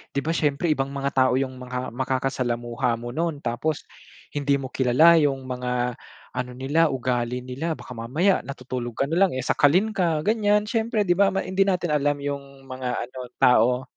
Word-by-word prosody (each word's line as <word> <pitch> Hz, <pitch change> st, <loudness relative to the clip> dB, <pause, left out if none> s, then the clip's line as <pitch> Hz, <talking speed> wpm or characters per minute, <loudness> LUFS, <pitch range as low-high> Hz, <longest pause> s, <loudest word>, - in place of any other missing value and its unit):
di 140 Hz, -, +1 dB
ba 160 Hz, -, -3 dB
siyempre 150 Hz, 0 st, 0 dB
ibang 135 Hz, -3 st, 0 dB
mga 140 Hz, 0 st, -1 dB
tao 130 Hz, -1 st, +4 dB
yung 130 Hz, -1 st, -3 dB
mga 125 Hz, 0 st, -4 dB
makakasalamuha 125 Hz, -1 st, -1 dB
mo 120 Hz, -, -5 dB
noon 160 Hz, +1 st, -2 dB
tapos 125 Hz, +6 st, -2 dB, 0.5 s
hindi 145 Hz, -1 st, +1 dB
mo 135 Hz, -1 st, -5 dB
kilala 145 Hz, +7 st, +5 dB
yung 140 Hz, -3 st, +1 dB
mga 125 Hz, -1 st, -2 dB, 0.3 s
ano 125 Hz, 0 st, -4 dB
nila 145 Hz, +6 st, +2 dB
ugali 125 Hz, -2 st, -2 dB
nila. 140 Hz, +6 st, -3 dB
Baka -, -, -12 dB
mamaya 135 Hz, -, +1 dB
natutulog 125 Hz, -2 st, -6 dB
ka -, -, +1 dB
na 160 Hz, +5 st, 0 dB
lang, 195 Hz, -2 st, +4 dB
eh, 130 Hz, -, -2 dB
sakalin 175 Hz, -, +3 dB
ka 170 Hz, -6 st, 0 dB
ganyan 210 Hz, 0 st, +2 dB
siyempre 220 Hz, 0 st, 0 dB
di 185 Hz, -, 0 dB
ba 200 Hz, 0 st, +5 dB
ma 195 Hz, -, 0 dB
hindi 195 Hz, +1 st, +1 dB
natin 180 Hz, -4 st, 0 dB
alam 145 Hz, -1 st, +2 dB
yung 140 Hz, -1 st, -6 dB
mga 130 Hz, 0 st, -4 dB, 0.2 s
ano 125 Hz, +2 st, -9 dB, 0.2 s
tao. 125 Hz, +1 st, +4 dB
135 Hz, 180 wpm, -24 LUFS, 125-165 Hz, 0.5 s, kilala